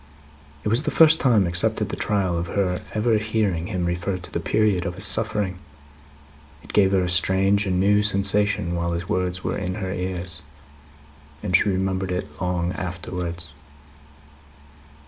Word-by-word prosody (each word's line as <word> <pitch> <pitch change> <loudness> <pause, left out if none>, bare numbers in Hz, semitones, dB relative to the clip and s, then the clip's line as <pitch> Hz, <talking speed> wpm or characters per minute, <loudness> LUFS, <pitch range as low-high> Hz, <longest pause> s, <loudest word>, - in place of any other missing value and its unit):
It - - -3
was 115 +5 +2
the - - -2
first 160 0 +6
time, 115 -7 +3
except 85 0 +2
at - - -2
the - - -3
trial, 95 -4 0
of 85 0 -2
her 90 -1 -1
ever 110 0 +2
hearing 105 -6 -1
him 90 -5 -2
refer 90 +2 -2
to 90 - -10
the - - -2
period 105 0 +1
of 90 -1 -4
his - - -5
suffering. 95 -3 0 1.0
It - - -11
gave 95 -2 +4
her 95 -2 +2
a - - -1
strange 95 +3 +2
and 90 -1 0
new 105 +2 +4
sensation 100 -2 +1
while 85 0 -1
his 85 +1 -4
words 90 -3 -2
were - - -2
in 90 -1 -3
her 95 -3 -4
ears; 90 -3 -2 1.0
and 90 -3 +1
she - - +4
remembered 95 -1 -1
it 90 +1 -5
long 90 -1 -1
afterwards. 85 -1 -5
95 Hz, 165 wpm, -23 LUFS, 90-100 Hz, 1.0 s, first